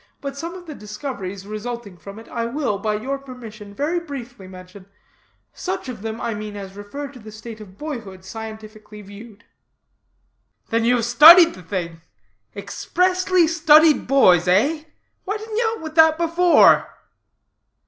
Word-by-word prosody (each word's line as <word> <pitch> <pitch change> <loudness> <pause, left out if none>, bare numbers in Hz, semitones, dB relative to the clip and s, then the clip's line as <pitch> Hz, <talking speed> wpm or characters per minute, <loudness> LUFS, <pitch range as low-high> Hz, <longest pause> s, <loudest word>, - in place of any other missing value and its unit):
But 275 -1 -6
some 335 +5 -6
of 360 -1 -11
the 315 - -8
discoveries 210 -5 -7
resulting 215 -1 -7
from 200 +3 -12
it, 225 - -12
I 230 -1 -3
will, 240 -5 -2
by 215 0 -1
your 270 +6 -4
permission, 230 -6 -11
very 310 +8 -1
briefly 245 - -9
mention; 185 +1 -13 0.7
such 370 -7 -5
of 230 -5 -8
them, 220 +1 -5
I 230 - -3
mean, 210 0 -7
as 195 -1 -9
refer 205 +9 -7
to 265 -2 -14
the 215 -1 -12
state 220 +1 -10
of 195 -2 -14
boyhood 225 -11 -8
scientifically 215 0 -10
viewed." 205 +2 -13 1.3
"Then 230 0 0
you 245 +1 +3
have 235 -2 -1
studied 330 +8 +8
the 185 - -12
thing? 170 -3 -5 0.5
expressly 365 0 0
studied 315 -1 +4
boys, 185 -10 +4
eh? 285 - +2 0.4
Why 410 +3 -2
didn't 435 0 -7
you 455 -1 +1
out 380 - -12
with 315 -1 -7
that 320 -1 +5
before?" 340 +1 +4
235 Hz, 160 wpm, -21 LUFS, 205-310 Hz, 1.3 s, studied